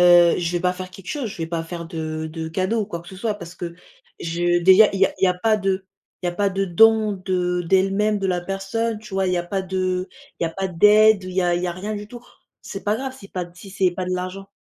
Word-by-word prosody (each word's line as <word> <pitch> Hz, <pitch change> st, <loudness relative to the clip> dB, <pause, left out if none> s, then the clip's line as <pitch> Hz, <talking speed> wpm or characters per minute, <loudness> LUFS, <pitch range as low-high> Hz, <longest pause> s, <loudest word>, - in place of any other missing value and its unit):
heu, 175 Hz, -1 st, +7 dB
je 170 Hz, -2 st, -1 dB
vais 175 Hz, -, 0 dB
pas 180 Hz, 0 st, +2 dB
faire 185 Hz, 0 st, -7 dB
quelque 185 Hz, 0 st, -13 dB
chose, 285 Hz, -6 st, -3 dB
je -, -, -9 dB
vais 165 Hz, -, -1 dB
pas 165 Hz, 0 st, -2 dB
faire 170 Hz, 0 st, -7 dB
de 160 Hz, -2 st, -4 dB
de 160 Hz, 0 st, -5 dB
cadeaux 185 Hz, +7 st, 0 dB
ou 210 Hz, -, -2 dB
quoi 170 Hz, -5 st, -5 dB
que 170 Hz, -, -14 dB
ce 190 Hz, -, -10 dB
soit 210 Hz, +2 st, -2 dB
parce 180 Hz, -3 st, -10 dB
que 170 Hz, -2 st, -6 dB, 0.4 s
je 175 Hz, +1 st, 0 dB
déjà 190 Hz, +3 st, +8 dB
il 195 Hz, -, -2 dB
y 195 Hz, -, +6 dB
a -, -, -6 dB
il -, -, +5 dB
y -, -, +5 dB
a 180 Hz, -, +2 dB
pas 215 Hz, +4 st, +2 dB
de 195 Hz, -1 st, -1 dB, 0.4 s
il -, -, +1 dB
y -, -, +2 dB
a -, -, -2 dB
pas 200 Hz, 0 st, +1 dB
de 195 Hz, +1 st, 0 dB
don 215 Hz, +3 st, +5 dB
de 180 Hz, -2 st, -1 dB
d'elle-même, 195 Hz, +4 st, +2 dB
de 195 Hz, -, -1 dB
la 180 Hz, -1 st, 0 dB
personne, 200 Hz, +4 st, -2 dB
tu 215 Hz, -2 st, -10 dB
vois? 190 Hz, -1 st, +1 dB
Il -, -, 0 dB
y -, -, +1 dB
a 175 Hz, -, -1 dB
pas 190 Hz, +2 st, -2 dB
de 185 Hz, 0 st, -1 dB, 0.3 s
il -, -, 0 dB
y -, -, +2 dB
a -, -, -3 dB
pas 195 Hz, +3 st, -3 dB
d'aide, 210 Hz, +3 st, +5 dB
il 185 Hz, -, -6 dB
y 185 Hz, +1 st, 0 dB
a 175 Hz, -1 st, +2 dB
il 175 Hz, -, -1 dB
y 180 Hz, -, 0 dB
a -, -, -2 dB
rien 200 Hz, +5 st, -5 dB
du 205 Hz, 0 st, -7 dB
tout. 240 Hz, +1 st, -11 dB, 0.4 s
C'est 195 Hz, -, -7 dB
pas 210 Hz, +1 st, +1 dB
grave 265 Hz, +1 st, -5 dB
si 195 Hz, -6 st, -13 dB
pas 180 Hz, -2 st, -3 dB
si 195 Hz, +2 st, -12 dB
c'est 185 Hz, -2 st, +1 dB
pas 180 Hz, 0 st, -4 dB
de 185 Hz, -, -2 dB
l'argent. 185 Hz, +2 st, -4 dB
185 Hz, 300 wpm, -22 LUFS, 175-205 Hz, 0.4 s, déjà